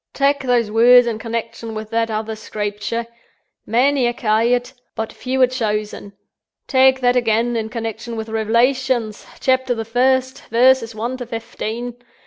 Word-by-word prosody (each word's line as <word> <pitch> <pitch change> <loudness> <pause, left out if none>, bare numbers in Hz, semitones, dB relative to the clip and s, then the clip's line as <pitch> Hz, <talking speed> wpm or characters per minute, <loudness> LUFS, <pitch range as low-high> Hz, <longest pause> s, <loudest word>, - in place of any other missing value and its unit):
"Tak' 280 +1 +2
those 245 -4 +1
words 245 +2 +6
in 225 -2 -3
connection 230 -1 -5
with 215 0 -7
that 230 0 0
other 220 0 -3
Screepture: 210 +2 -4 0.6
Many 255 +3 +2
are 240 - 0
ca'ad, 240 +3 +1 0.2
but 220 0 -4
few 260 +1 -3
are - - +9
chosen. 210 -5 -3 0.5
Tak' 265 -1 +4
that 245 0 +3
again, 235 0 +1
in 220 -1 -2
connection 230 0 -5
with 220 0 -5
Rev'lations, 235 +1 0
Chapter 260 -1 +1
the 225 -1 -4
First, 260 +3 +1
verses 235 -1 +3
One 235 +4 -3
to 245 -2 -7
Fefteen. 230 +1 -5
235 Hz, 145 wpm, -19 LUFS, 220-255 Hz, 0.6 s, are